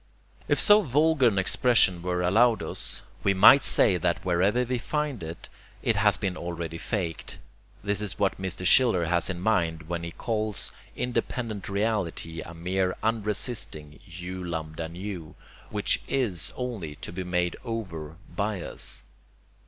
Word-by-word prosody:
If - - +2
so 210 0 +7
vulgar 150 - +3
an 105 -4 +1
expression 95 -2 +3
were 90 0 -1
allowed 110 +6 +4
us, - - -3 0.2
we 100 -1 +3
might 110 +8 +8
say 95 - +5
that 85 - -1
wherever 95 +7 +2
we 125 0 -2
find 150 -2 -2
it, 80 0 -7 0.4
it - - +2
has - - +4
been 95 -2 -2
already 85 -2 -5
FAKED. 90 -7 -3 0.5
This 100 0 -1
is 100 -5 -4
what 95 -2 0
Mr. 90 -1 -4
Schiller 110 -7 +5
has 85 +2 +1
in 90 -2 -3
mind 85 -5 +1
when 85 0 -3
he 85 - -5
calls 110 +1 -2 0.2
independent 115 -4 -3
reality 100 -6 -2
a 85 - -9
mere 90 +2 -1
unresisting 105 - -2
[u 90 +2 -7
lambda 80 -1 -4
nu], 90 -2 -7 0.3
which - - +1
IS 110 -12 0
only 110 - -4
to - - -8
be 90 +2 -4
made 90 -1 0
over 90 -10 -5 0.2
by 105 -1 -1
us. 70 -6 -4
95 Hz, 150 wpm, -27 LUFS, 85-110 Hz, 0.5 s, might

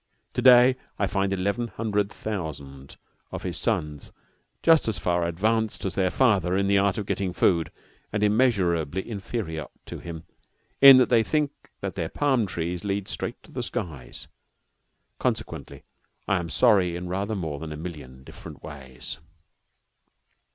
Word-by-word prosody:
To - - -1
day 125 0 +7 0.2
I 100 - +1
find 95 0 0
eleven 100 +5 -1
hundred 105 -3 -1
thousand 70 -9 -6 0.3
of - - -6
his 90 -3 -3
sons 80 - -2 0.5
just 165 -5 +5
as 110 -2 0
far 85 -1 0
advanced 110 +6 0
as 95 - -2
their 95 -1 +1
father 95 -7 +2
in 100 - +1
the 100 0 +3
art 100 +2 +1
of 105 - -3
getting 95 -2 -2
food, 85 -3 +2 0.4
and 105 -1 -1
immeasurably 95 - +1
inferior 100 - -4 0.2
to - - -7
him 85 -2 -8 0.6
in 135 -1 +11
that 130 - +4
they 115 -2 +5
think 150 +4 0 0.3
that 100 -1 -3
their 80 -4 -3
palm 130 -7 +1
trees 85 0 -3
lead 100 -1 -2
straight - - -5
to - - -17
the - - -4
skies. 70 -8 -6 0.9
Consequently, 70 - -3 0.4
I 95 - +2
am 85 -1 -5
sorry 95 - +3
in 90 +1 -5
rather 100 +4 -2
more 80 -7 -4
than 80 0 -6
a 75 - -6
million 75 -6 -8
different - - -12
ways. 65 -4 -8
95 Hz, 155 wpm, -25 LUFS, 85-110 Hz, 0.9 s, in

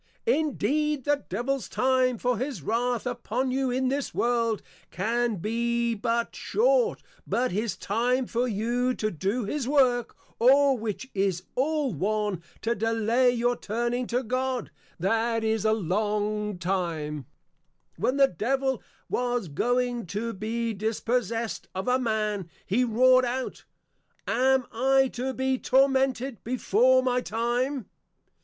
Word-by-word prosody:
Indeed, 300 - +1
the 290 -1 +1
Devil's 245 +7 -2
time 255 -1 +2
for 245 -1 0
his 265 +1 -4
Wrath 240 +2 0
upon 245 +1 -2
you 265 0 0
in 255 +1 0
this 275 +1 -2
World, 230 -3 +1 0.3
can 230 +5 0
be 235 +4 0
but 230 +2 -1
short, - - +1 0.2
but 250 +2 0
his 205 0 -2
time 245 +6 0
for 240 +2 -1
you 240 +4 0
to 215 0 -1
do 195 +9 -1
his 260 +4 -2
Work, 255 -4 +2 0.2
or, 275 +3 +5
which 225 +2 -4
is 190 -3 0
all 290 -1 0
one, 205 +2 -1 0.2
to 230 - +1
delay 225 +3 +2
your 245 0 +1
turning 240 +3 -2
to 245 +2 0
God, 255 0 -2 0.3
that 225 +5 +1
is 220 -1 0
a 215 - +4
Long 210 +1 -1
Time. 165 -6 -2 0.7
When 255 - 0
the 275 -1 +6
Devil 265 +5 -1 0.3
was 245 -6 -1
going 245 - 0
to 225 +6 -3
be 225 +3 -2
Dispossessed 225 +1 -2
of 190 +4 -3
a 250 +1 +3
Man, 215 -6 -1 0.2
he 230 +7 +2
Roar'd 255 +2 +5
out, 255 +1 -4 0.6
_Am 260 +1 +3
I 265 +3 +3
to 255 +2 -3
be 260 0 0
Tormented 265 -2 +2
before 255 +1 +3
my 250 -1 +1
time? 240 +3 -1
240 Hz, 135 wpm, -27 LUFS, 215-255 Hz, 0.7 s, the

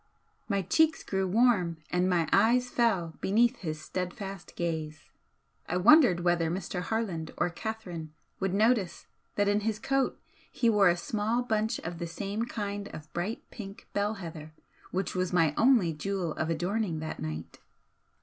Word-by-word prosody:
My 200 -2 +1
cheeks 320 - +3
grew 190 -1 -1
warm 190 -5 +3
and 180 +1 +2
my 170 -3 +2
eyes 250 +2 +4
fell 195 -9 +1
beneath 235 +5 +3
his 155 -4 -4
steadfast 185 +3 -5
gaze. 155 -3 -4 0.6
I 180 - +1
wondered 210 - +6
whether 175 -2 +2
Mr. 180 +1 -3
Harland 185 -7 -2
or 175 - +1
Catherine 180 -6 -6 0.3
would 195 -1 0
notice 215 -3 +2 0.3
that 205 -1 +2
in 205 +1 +3
his 215 0 -1
coat 270 +4 0 0.3
he 235 -2 +2
wore 205 -3 +5
a 175 - +2
small 220 +6 -1
bunch 220 -2 0
of 170 0 -6
the 170 - -3
same 200 +6 -3
kind 205 -3 -4
of 155 -4 -10
bright 195 +7 -3
pink 200 -3 -9
bell 205 +2 0
heather 160 -5 -8 0.4
which 190 +2 -2
was 185 -1 -1
my 165 -4 +3
only 225 -9 +4
'jewel 180 +1 -2
of 155 +1 -2
adorning' 180 +2 -1
that 160 - -5
night. 80 +1 -6
190 Hz, 160 wpm, -29 LUFS, 170-220 Hz, 0.6 s, wondered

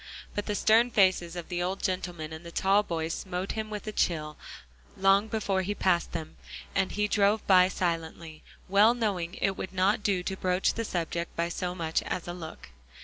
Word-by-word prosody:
But 205 - -3
the 210 - -1
stern 225 +4 +4
faces 185 -5 +2
of 175 -1 -6
the 175 -1 -2
old 185 +2 -2
gentleman 175 -4 -3
and 160 +1 -8
the 170 - -9
tall 195 +4 +3
boy 165 -5 -3
smote 185 +2 -3
him 220 -1 -4
with 210 -1 -6
a 215 - -3
chill, 155 -6 -1 0.6
long 195 +2 +4
before 205 -3 0
he 205 +3 -2
passed 175 -3 +1
them, 160 0 -6 0.4
and 190 -1 +1
he 210 0 0
drove 205 +1 +2
by 185 -2 +6
silently, 165 -3 -3 0.3
well 205 +5 +5
knowing 195 -7 -2
it 195 - 0
would 190 - -5
not 190 +3 +2
do 195 -3 0
to 190 - -3
broach 185 0 +1
the 230 - -3
subject 170 -2 -3
by 170 0 0
so 180 +1 -3
much 165 -2 -1
as 175 - -4
a 175 - -4
look. 160 - -9
185 Hz, 200 wpm, -28 LUFS, 170-205 Hz, 0.6 s, by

